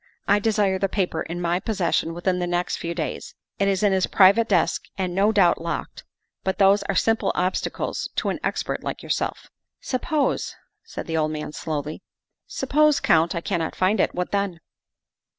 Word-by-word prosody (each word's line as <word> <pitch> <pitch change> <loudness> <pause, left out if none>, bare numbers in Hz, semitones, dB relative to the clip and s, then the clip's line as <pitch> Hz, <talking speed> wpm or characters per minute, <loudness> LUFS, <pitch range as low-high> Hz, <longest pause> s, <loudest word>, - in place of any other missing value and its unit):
I 205 +1 +4
desire 205 -3 +1
the 195 - 0
paper 190 -2 -1
in 175 +2 -5
my 175 +1 +1
pos 220 +1 -3
session 165 -2 0
within 180 +1 0
the 175 - -1
next 175 0 -1
few 170 0 -4
days. 155 -5 -4 0.2
It 200 - +2
is 195 0 +1
in 205 -2 +4
his 190 -1 +2
private 200 +4 +5
desk 180 -5 +1
and 185 -2 -2
no 200 +4 +3
doubt 185 -6 +3
locked, 170 0 -5 0.4
but 190 - -1
those 200 0 +5
are - - 0
simple 225 0 +2
obstacles 185 +1 -2
to - - 0
an - - -2
expert - - -2
like - - -5
yourself." - - -3 0.2
" - - -63
Suppose," 290 +3 0 0.3
said 455 - -7
the 165 -1 -2
old 155 -1 +1
man 150 -1 -5
slowly, 150 -1 -4 0.3
" - - -60
suppose, 300 0 +2
Count, 165 +2 +3
I 170 - -2
cannot 170 -4 -2
find 190 +3 +2
it. - - +1
What 180 0 -2
then?" 200 -4 -1
185 Hz, 190 wpm, -24 LUFS, 170-205 Hz, 0.4 s, private